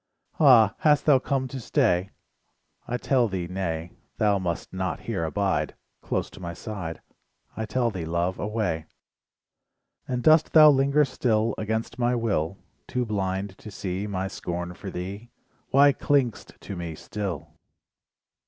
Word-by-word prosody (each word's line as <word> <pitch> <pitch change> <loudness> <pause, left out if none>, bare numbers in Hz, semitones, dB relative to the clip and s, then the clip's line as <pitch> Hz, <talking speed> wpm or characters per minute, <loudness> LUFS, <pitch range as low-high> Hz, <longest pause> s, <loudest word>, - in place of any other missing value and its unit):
Ah, 120 -8 +7
hast 150 -2 +3
thou 145 -4 +6
come 130 0 -1
to 135 - -6
stay? 105 - +1 0.8
I 125 - -1
tell 125 -2 +2
thee 95 -4 -3
nay, 85 -2 -3 0.3
Thou 105 -2 +3
must 85 -3 -4
not 95 0 -2
here 100 -8 -3
abide, 95 +4 0 0.3
Close - - -2
to - - -12
my 85 -2 -6
side, 90 -6 -6 0.5
I 110 -1 -3
tell 120 -1 +1
thee 90 -5 -5
Love, 85 +2 -1
away. 105 -7 -2 1.2
And 125 -1 -2
dost 155 0 +5
thou 155 -1 +9
linger 140 +2 +3
still 115 -4 +1
Against 110 +2 -3
my 120 0 +2
will? 100 -7 -1 0.3
Too 125 -1 -1
blind 95 -2 -2
to 110 - -9
see 95 0 -4
My 95 -1 -2
scorn 90 -2 -4
for 95 +2 -8
thee, 95 +6 -6 0.4
Why 140 +1 +6
cling'st 130 -5 0
to 100 - -6
me 85 -2 -5
still? 95 -3 -5
105 Hz, 145 wpm, -26 LUFS, 90-125 Hz, 1.2 s, thou